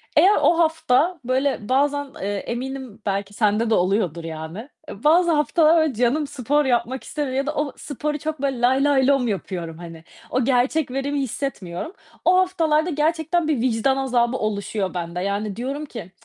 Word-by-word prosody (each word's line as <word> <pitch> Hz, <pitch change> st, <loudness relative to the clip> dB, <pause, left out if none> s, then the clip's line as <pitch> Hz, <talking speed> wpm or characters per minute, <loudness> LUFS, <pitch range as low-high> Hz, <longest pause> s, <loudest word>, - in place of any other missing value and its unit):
Eğer 400 Hz, +3 st, +6 dB
o 335 Hz, -, +4 dB
hafta 320 Hz, +1 st, +2 dB
böyle 255 Hz, -3 st, -1 dB
bazen, 285 Hz, +1 st, +1 dB
eee, 195 Hz, -, -2 dB, 0.2 s
eminim 255 Hz, -2 st, -5 dB
belki 200 Hz, 0 st, -2 dB
sende 215 Hz, +1 st, +1 dB
de -, -, +3 dB
oluyordur 180 Hz, -3 st, 0 dB
yani. 165 Hz, -, -7 dB, 0.2 s
Bazı 330 Hz, -, +3 dB
haftalar 315 Hz, +2 st, +4 dB
öyle 315 Hz, -4 st, +1 dB
canım 250 Hz, +6 st, +1 dB
spor 290 Hz, +1 st, 0 dB
yapmak 255 Hz, +1 st, 0 dB
istemiyor 285 Hz, -4 st, -3 dB
ya 275 Hz, -, 0 dB
da 300 Hz, +1 st, -3 dB
o 295 Hz, -1 st, -1 dB
sporu 300 Hz, +1 st, -3 dB
çok 310 Hz, -2 st, -4 dB
böyle 270 Hz, -3 st, -1 dB
lay 260 Hz, +3 st, +3 dB
lay 275 Hz, -3 st, +3 dB
lom 275 Hz, -3 st, +3 dB
yapıyorum 175 Hz, -5 st, -4 dB
hani. 165 Hz, -2 st, -10 dB, 0.3 s
O 255 Hz, +1 st, 0 dB
gerçek 260 Hz, +2 st, +1 dB
verimi 280 Hz, +2 st, -1 dB
hissetmiyorum. 255 Hz, -, -4 dB, 0.3 s
O 365 Hz, +1 st, +5 dB
haftalarda 335 Hz, -3 st, +2 dB
gerçekten 320 Hz, +1 st, 0 dB
bir 285 Hz, -7 st, +1 dB
vicdan 255 Hz, +2 st, +1 dB
azabı 250 Hz, -2 st, +1 dB
oluşuyor 205 Hz, -2 st, -2 dB
bende. 175 Hz, 0 st, -4 dB
Yani 200 Hz, +1 st, -2 dB
diyorum 275 Hz, +5 st, -4 dB
ki, 210 Hz, -10 st, -9 dB
265 Hz, 165 wpm, -22 LUFS, 210-295 Hz, 0.3 s, Eğer